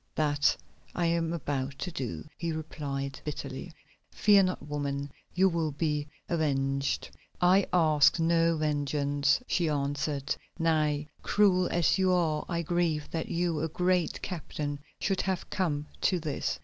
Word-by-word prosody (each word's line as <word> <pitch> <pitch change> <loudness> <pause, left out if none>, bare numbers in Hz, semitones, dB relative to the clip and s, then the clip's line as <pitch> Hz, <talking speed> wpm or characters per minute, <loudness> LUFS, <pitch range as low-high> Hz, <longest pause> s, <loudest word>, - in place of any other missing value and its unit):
"That 145 -1 +2 0.4
I 175 - +1
am 165 -1 +1
about 140 -4 -3
to 180 - -4
do," 125 - -5
he 170 -1 -3
replied 140 -3 -4
bitterly. 145 +2 -5 0.4
"Fear 205 -1 +5
not, 185 - -5
woman, 140 -1 -3 0.2
you 190 +1 +5
will 165 -4 0
be 150 -1 -1 0.2
avenged." 140 -4 0 0.3
"I 185 +2 +4
ask 155 -3 +4
no 165 0 +3
vengeance," 145 - +1
she 170 -8 +1
answered. 145 0 -1 0.2
"Nay, 155 -3 +1
cruel 185 -3 +3
as 175 +2 +2
you 185 -1 +3
are 165 -4 +1
I 170 -1 -1
grieve 165 -3 0
that 165 -1 -3
you, 170 -2 0
a 160 - 0
great 180 +1 0
captain, 150 -5 -4 0.2
should 195 -1 0
have 190 -2 -3
come 150 -7 0 0.2
to 185 - +2
this." 155 -3 -2
155 Hz, 140 wpm, -29 LUFS, 145-175 Hz, 0.4 s, Fear